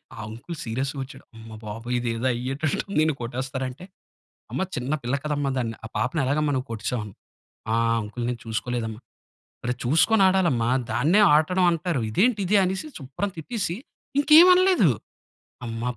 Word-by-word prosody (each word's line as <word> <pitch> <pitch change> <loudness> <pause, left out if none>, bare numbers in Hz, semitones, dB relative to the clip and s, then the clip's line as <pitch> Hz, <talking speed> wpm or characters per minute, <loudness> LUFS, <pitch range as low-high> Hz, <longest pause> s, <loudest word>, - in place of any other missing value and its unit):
ఆ - - -14
అంకుల్, 120 +10 -8
సీరియస్‌గా 135 +4 -3
వచ్చాడు. 135 - -13
అమ్మ 110 0 -11
బాబోయ్! 115 +4 -4
ఇదేదో 115 0 -2
అయ్యేటట్టు 135 +5 -2
ఉంది. 200 - 0
ఈడ్ని 155 0 +2
కొట్టేస్తారంటే, 130 +5 -4 0.7
"అమ్మ, - - -1
చిన్న 125 +3 -3
పిల్ల 120 +3 -1
కదమ్మా! 145 -2 -1
దాన్ని 115 -2 -2
ఆ - - -6
పాపని, 130 +5 0
ఎలాగమ్మా 145 +2 +1
నువ్వు 130 +1 -3
కొట్టేసావు?" 115 +1 -3 0.7
"ఆహ్, 115 0 +2
అంకుల్ 110 +3 -6
నేను 120 -1 -3
చూసుకోలేదమ్మ" 115 0 -3
అన్నాడు. - - -33 0.6
"ఒరేయ్, 125 0 -2
చూసుకొని 190 - +4
ఆడాలమ్మ! 175 -11 +2 0.3
దాన్నే 160 - +3
ఆడడం, 180 +4 +3
అంటారు. 165 -4 -1
ఇదేంటిది?" 205 - +2
అనేసి 190 +10 -2
శుభ్రం 140 +10 -4
తిట్టేసి, 175 +1 -3 0.4
ఇంకేమి 315 +5 +8
అనలేదు. 370 - +4 0.8
అమ్మ! 115 0 -5
135 Hz, 145 wpm, -25 LUFS, 120-175 Hz, 0.8 s, ఇంకేమి